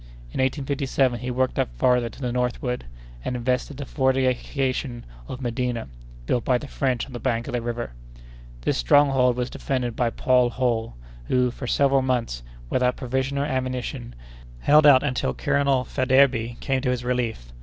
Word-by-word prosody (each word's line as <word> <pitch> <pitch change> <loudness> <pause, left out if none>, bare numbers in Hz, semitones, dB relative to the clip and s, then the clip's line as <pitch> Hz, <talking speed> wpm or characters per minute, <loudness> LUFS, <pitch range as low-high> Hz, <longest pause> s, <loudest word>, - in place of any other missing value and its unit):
In - - -1
1857 135 -2 0
he 125 +2 -4
worked 130 +1 0
up - - +1
farther 125 - +2
to 140 - -14
the 125 -2 -1
northward, 125 - -2 0.4
and 125 - -2
invested 125 +3 -1
the 140 - -5
fortification 130 -1 0 0.2
of 130 - -7
Medina, 120 - -2 0.4
built 120 - 0
by 125 - +2
the 145 - -8
French 130 -3 -1
on 135 - -13
the 120 - -5
bank 120 -2 -1
of - - -5
the 120 - 0
river. 120 - -4 0.7
This - - 0
stronghold 130 - +4
was 125 0 -2
defended 125 -4 -2
by 120 -2 +1
Paul 125 +1 +2
Holl, 115 - -1 0.3
who, 125 - +2
for 125 +1 -7
several 135 +1 +3
months, 120 - -1 0.3
without 125 - +1
provisions 130 +2 -2
or - - 0
ammunition, 130 - -3 0.5
held 150 +1 +6
out 135 -2 +7
until 125 - -1
Colonel 135 - +1
Faidherbe 130 -3 +2
came 135 -1 0
to 130 - 0
his 125 -1 -1
relief. 120 - -2
125 Hz, 165 wpm, -24 LUFS, 120-130 Hz, 0.7 s, out